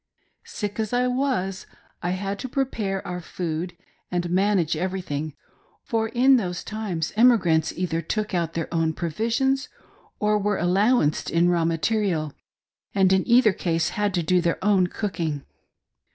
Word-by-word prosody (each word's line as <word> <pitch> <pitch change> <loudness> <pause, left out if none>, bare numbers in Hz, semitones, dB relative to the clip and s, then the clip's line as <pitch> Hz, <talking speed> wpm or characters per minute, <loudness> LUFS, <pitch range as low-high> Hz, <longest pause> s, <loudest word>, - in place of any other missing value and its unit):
Sick 205 +1 -5
as 220 +1 -2
I 245 +1 +2
was, 250 -8 -1 0.3
I 175 - -1
had 200 +1 -3
to 260 - -5
prepare 220 -8 -2
our 180 0 -4
food, 175 +1 -4 0.3
and 175 -1 -2
manage 185 -3 +2
every 185 +4 -2
thing, 150 -3 -4 0.5
for 225 -3 -1
in 255 +3 +5
those 180 -6 -3
times 200 -8 -3
emigrants 185 -9 +4
either 165 -2 -2
took 210 +6 -3
out 170 -2 -1
their 165 -1 -2
own 165 -1 +1
provisions 235 - 0 0.5
or 210 0 +2
were 205 0 0
allowanced 190 -2 +2
in 170 +1 +3
raw 170 -2 +2
material, 165 -2 0 0.6
and 190 -1 +4
in 190 - +2
either 235 -3 +5
case 165 -3 0
had 205 -1 -1
to 175 - 0
do 180 +2 +3
their 170 -1 0
own 195 -3 +4
cooking. 165 -8 -3
185 Hz, 150 wpm, -24 LUFS, 170-215 Hz, 0.6 s, in